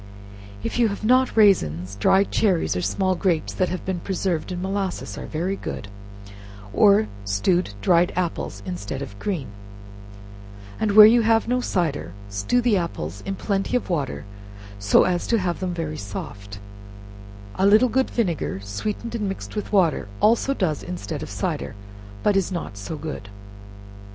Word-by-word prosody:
If - - -2
you 235 - +5
have 205 +1 -4
not 255 +1 +3
raisins, 95 - +3
dried 190 - +3
cherries 185 - +2
or 90 - -1
small 185 - +1
grapes, 170 -3 0
that 185 - 0
have 185 - -4
been 185 -2 -2
preserved 180 -2 -2
in 180 - -3
molasses, 195 0 -3
are - - -7
very 175 +5 -2
good, 105 - -6 0.8
or 210 +1 +5 0.2
stewed 105 - 0
dried 175 - +4
apples, 170 - -3
instead 100 +9 -4
of 100 -7 -10
green; 175 - -3 1.3
and 215 -2 +1
where 210 0 +11
you 235 +2 +6
have 225 0 +3
no 250 +1 +1
cider, 155 - -1 0.2
stew 100 - 0
the 235 -4 +3
apples 100 - -4
in 195 - -2
plenty 195 +5 0
of 240 - -5
water, 145 - -2 0.5
so 100 0 +5
as 180 -1 0
to 230 - +3
have 180 -4 -1
them 185 -1 -2
very 155 -2 -3
soft; 100 0 -7 1.0
a 190 - +2
little 215 +5 +6
good 260 +2 +1
vinegar, 175 - -1
sweetened 210 - -4
and 210 -4 -2
mixed 195 - -6
with 210 - -4
water, 175 - +2
also 235 +5 +3
does 160 - -1
instead 170 -4 -5
of 155 - -6
cider, 165 - -3 0.5
but 205 - +3
is 195 -1 +1
not 170 - -4
so 100 +11 -6
good. 145 -10 -6
180 Hz, 160 wpm, -23 LUFS, 140-205 Hz, 1.3 s, where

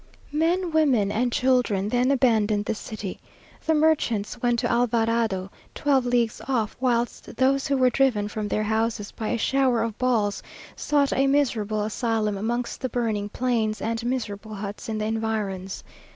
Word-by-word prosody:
Men, 335 +4 +1
women, 265 -11 +3
and 245 +3 0
children 245 -7 +2
then 245 +3 +2
abandoned 220 -6 +2
the - - 0
city. 210 -3 -6 0.4
The 320 - +2
merchants 265 -10 +1
went 240 -1 +2
to - - 0
Alvarado, 230 -5 +1 0.2
twelve 270 -3 +2
leagues 240 -2 +1
off, 235 -6 0
whilst 240 -2 -1
those 270 +3 +2
who 280 -1 +1
were 255 -1 +4
driven 240 -7 +2
from 210 0 -4
their 215 - 0
houses 220 -1 -1
by 220 - -5
a 240 - 0
shower 255 -1 +2
of 225 -2 -3
balls, 225 -5 +1 0.3
sought 285 -2 +1
a 270 +1 +2
miserable 220 -7 +1
asylum 220 -1 -1
amongst 235 +4 -3
the 260 - -1
burning 220 -4 -1
plains 225 -3 0
and 230 +1 -2
miserable 220 -4 -3
huts 205 +2 -6
in 220 - -2
the 215 - -2
environs. 215 -4 -3
230 Hz, 160 wpm, -25 LUFS, 215-255 Hz, 0.4 s, were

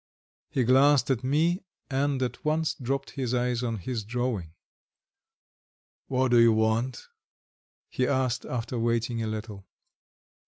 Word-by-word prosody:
He 130 - +1
glanced 135 +2 +4
at 130 -1 0
me, 160 +7 +2 0.3
and 135 -1 0
at 125 - -4
once 155 +1 +1
dropped 135 +2 -3
his 125 -2 -2
eyes 125 -1 0
on 115 -3 -2
his 110 +4 -4
drawing. 110 -7 -3 1.5
"What 130 -1 +1
do 120 - +6
you 115 -1 +6
want?" 110 +3 0 0.8
he 130 - -1
asked, 130 -2 0
after 120 0 -3
waiting 115 0 0
a 110 - -2
little. 105 -2 -6
125 Hz, 130 wpm, -27 LUFS, 115-130 Hz, 1.5 s, do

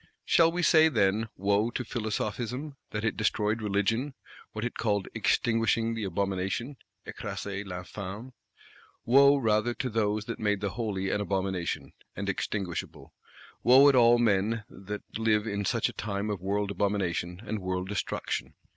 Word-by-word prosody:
Shall 165 -1 +5
we 175 +1 -2
say, 160 -1 +6
then: 110 -3 +1
Wo 100 +4 +1
to 125 - -3
Philosophism, 120 +5 -3
that 105 +1 -3
it 110 - 0
destroyed 110 0 0
Religion, 110 +7 0 0.4
what 110 +1 -4
it 125 - -3
called 105 -4 0
"extinguishing 115 0 +1
the 110 -2 -3
abomination 100 +7 -2 0.3
(écraser 100 0 -5
l'infâme)"? 100 +5 -7 0.7
Wo 140 +3 +6
rather 115 -1 +1
to 125 - -3
those 105 -1 0
that 115 - -5
made 105 -2 +1
the 100 -1 -2
Holy 95 -3 -2
an 105 - 0
abomination, 95 -3 -2 0.2
and - - -3
extinguishable; 85 -7 -4 0.5
wo 130 +4 +7
at 140 - +3
all 120 -1 +6
men 110 -1 +1
that 100 +2 -7 0.2
live 110 -1 +2
in 100 -2 -2
such - - +1
a - - -6
time 100 0 -3
of 100 -4 -4
world 100 +1 -1
abomination 95 -4 -1
and 110 0 -3
world 95 0 -3
destruction! 105 +1 -3
105 Hz, 150 wpm, -28 LUFS, 100-115 Hz, 0.7 s, wo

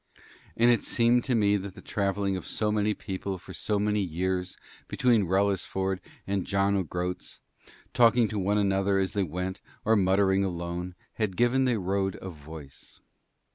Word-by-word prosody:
And 120 +1 +5
it 115 - +2
seemed 120 +1 +3
to 125 - +1
me 105 -2 +3
that 100 -1 -7
the - - -11
travelling 100 -1 -1
of 95 - -6
so 105 -1 -1
many 105 0 +1
people 95 -1 -4
for - - -11
so 105 - -1
many 105 +1 +1
years 90 +1 -2 0.3
between 115 -6 +2
Wrellisford 95 0 0 0.3
and 100 -1 -1
John 100 0 +2
o' 95 - +2
Groat's, 90 +1 -5 0.5
talking 120 -1 +5
to 105 - -2
one 100 +2 +1
another 100 -1 +2
as 95 -1 0
they 100 - 0
went 90 +2 -3 0.2
or 110 - +4
muttering 95 0 +3
alone, 90 0 -4 0.2
had 105 -5 -1
given 120 +2 +3
the 125 -3 +2
road 95 0 -1
a 95 - -7
voice. 75 -3 -12
100 Hz, 170 wpm, -28 LUFS, 95-105 Hz, 0.5 s, And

